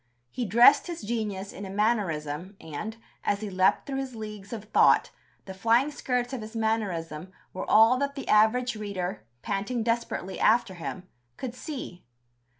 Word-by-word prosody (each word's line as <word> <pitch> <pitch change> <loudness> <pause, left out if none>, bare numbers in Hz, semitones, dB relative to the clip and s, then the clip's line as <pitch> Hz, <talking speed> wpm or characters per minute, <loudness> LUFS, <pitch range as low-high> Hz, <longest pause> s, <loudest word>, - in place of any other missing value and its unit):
He 245 - -3
dressed 235 - +6
his 340 -8 -6
genius 205 -3 -3
in - - -8
a 195 - -6
mannerism, 190 -5 -1
and, 210 +9 -6 0.3
as 205 0 0
he 210 -2 -4
leaped 185 0 +2
through 270 -1 -3
his 265 -2 -5
leagues 210 -2 -8
of 225 -4 -5
thought, 215 - +4 0.3
the 190 - -7
flying 230 +9 +2
skirts 250 -3 -2
of 255 - -3
his 215 +1 -9
mannerism 185 -7 -2 0.2
were 185 - -5
all 225 +4 +6
that 280 0 -1
the 275 - -6
average 235 +3 +3
reader 195 - -4 0.2
panting 210 +4 -2
desperately 230 -5 -2
after 230 -3 +3
him 180 +1 -6 0.3
could 255 -3 -5
see. 250 - -7
215 Hz, 160 wpm, -27 LUFS, 190-240 Hz, 0.3 s, dressed